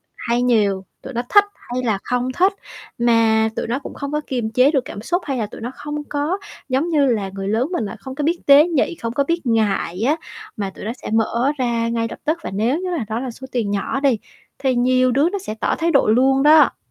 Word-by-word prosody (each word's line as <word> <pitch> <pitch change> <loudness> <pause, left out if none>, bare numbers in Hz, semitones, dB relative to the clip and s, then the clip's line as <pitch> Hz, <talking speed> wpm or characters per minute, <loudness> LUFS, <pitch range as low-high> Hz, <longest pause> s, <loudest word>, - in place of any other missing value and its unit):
hay 240 +1 -1
nhiều, 205 -6 +2 0.2
tụi 265 - -8
nó 240 - -1
thích 410 0 +6 0.3
hay 255 - -1
là 215 -5 0
không 250 +1 -1
thích, 375 +7 +2 0.4
mà 225 -2 +3
tụi - - -3
nó 245 +4 -1
cũng - - -9
không 280 0 -5
có 300 0 -1
kiềm 240 -4 -2
chế 255 +5 +4
được 265 -5 0
cảm 205 - -7
xúc 350 - -1
hay 270 -3 -2
là 220 - -1
tụi 205 - -11
nó 240 +3 -4
không 295 0 -5
có 295 +6 -1 0.3
giống 270 +6 +1
như 295 -4 +3
là 210 -6 0
người 195 0 -4
lớn 225 +8 0
mình 230 - -1
là 200 - -6
không 260 +3 -8
có 295 - -3
biết 335 +3 +1
tế 290 +4 +7
nhị, 335 0 0
không 230 -5 -5
có 280 - +2
biết 335 0 -2
ngại 210 -5 0
á 285 +7 +3 0.4
mà 200 -2 -2
tụi 190 - -10
nó 225 - -2
sẽ - - -6
mở 235 +4 +1
ra 235 -2 0
ngay 230 -1 -1
lập - - -9
tức 315 +3 +1
và - - -5
nếu 235 - +1
như 370 - -3
là 290 -11 -2
đó 220 +1 -2
là 255 -1 -4
số 265 +3 -10
tiền 225 -5 -1
nhỏ 205 +6 -1
đi 270 -5 +2 0.4
thì 265 -2 +1
nhiều 255 +1 +3
đứa 280 +7 +3
nó 400 - -3
sẽ 290 - -6
tỏ - - +1
thái 335 0 0
độ - - +3
luôn 265 +4 +3
đó. 305 +1 +6
255 Hz, 255 wpm, -20 LUFS, 225-290 Hz, 0.4 s, tế